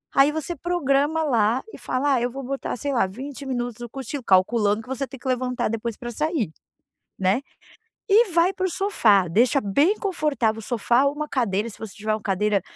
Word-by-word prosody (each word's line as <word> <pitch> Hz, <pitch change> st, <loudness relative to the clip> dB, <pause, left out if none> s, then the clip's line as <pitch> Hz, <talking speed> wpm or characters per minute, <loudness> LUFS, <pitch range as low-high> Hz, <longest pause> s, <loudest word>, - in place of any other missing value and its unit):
Aí 275 Hz, +2 st, +6 dB
você 315 Hz, +2 st, -3 dB
programa 315 Hz, -1 st, +1 dB
lá 235 Hz, -3 st, +2 dB
e -, -, -8 dB
fala: 275 Hz, +2 st, 0 dB
"Ah, 245 Hz, -, +1 dB
eu 245 Hz, -, 0 dB
vou 270 Hz, +2 st, -6 dB
botar 270 Hz, +2 st, -3 dB
sei 280 Hz, +4 st, -2 dB
lá 235 Hz, -, +3 dB
20 270 Hz, +8 st, -8 dB
minutos, 245 Hz, -3 st, -3 dB
no 240 Hz, -, -6 dB
cochilo". 270 Hz, +2 st, -6 dB
Calculando 205 Hz, +2 st, +3 dB
que 225 Hz, -, -17 dB
você 265 Hz, +1 st, -2 dB
tem 270 Hz, -, -11 dB
que 265 Hz, -, -8 dB
levantar 250 Hz, -2 st, 0 dB
depois 230 Hz, 0 st, -3 dB
pra 240 Hz, -, -6 dB
sair, 295 Hz, -, -1 dB, 0.7 s
né, 190 Hz, +6 st, +2 dB, 0.7 s
e 425 Hz, 0 st, +5 dB
vai 345 Hz, +3 st, +3 dB
pro 375 Hz, 0 st, -1 dB
sofá 230 Hz, -, +3 dB
deixa 240 Hz, -, +3 dB
bem 285 Hz, -, +2 dB
confortável 290 Hz, -, 0 dB
o -, -, -7 dB
sofá, 240 Hz, +3 st, +2 dB
uma 295 Hz, +2 st, -1 dB
cadeira 225 Hz, -4 st, 0 dB
se 215 Hz, -, -10 dB
você 220 Hz, -3 st, -7 dB
tiver, 215 Hz, +1 st, -2 dB
uma 215 Hz, -, -3 dB
cadeira 200 Hz, +1 st, +1 dB
255 Hz, 200 wpm, -24 LUFS, 220-290 Hz, 0.7 s, Aí